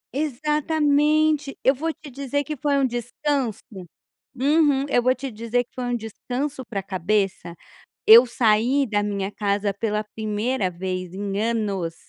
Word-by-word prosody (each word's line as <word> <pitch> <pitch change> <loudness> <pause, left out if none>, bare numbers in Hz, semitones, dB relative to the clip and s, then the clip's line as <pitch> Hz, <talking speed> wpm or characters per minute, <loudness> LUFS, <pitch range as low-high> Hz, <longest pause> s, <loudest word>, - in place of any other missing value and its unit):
Exatamente, 300 +1 +1
eu 265 - +5
vou 320 +5 -2
te 305 -2 -13
dizer 280 +2 -2
que 305 +3 -5
foi 285 +1 0
um 275 - +3
descanso. 245 -1 -2 0.7
Uhum. 285 +1 +2
Eu 245 -3 +2
vou 255 - +4
te 265 +1 -6
dizer 230 +2 -1
que - - -56
foi 255 - -4
um 245 0 -1
descanso 255 +4 -5
pra 195 -1 -3
cabeça, 190 -1 -1 0.5
eu 235 +3 +10
saí 240 +4 +2
da 205 -3 0
minha 200 -1 -3
casa 200 -1 -1
pela 210 +1 -2
1º 215 -1 -1
vez 185 0 -5
em 200 +1 -3
anos 205 -7 -1
240 Hz, 150 wpm, -23 LUFS, 205-280 Hz, 0.7 s, eu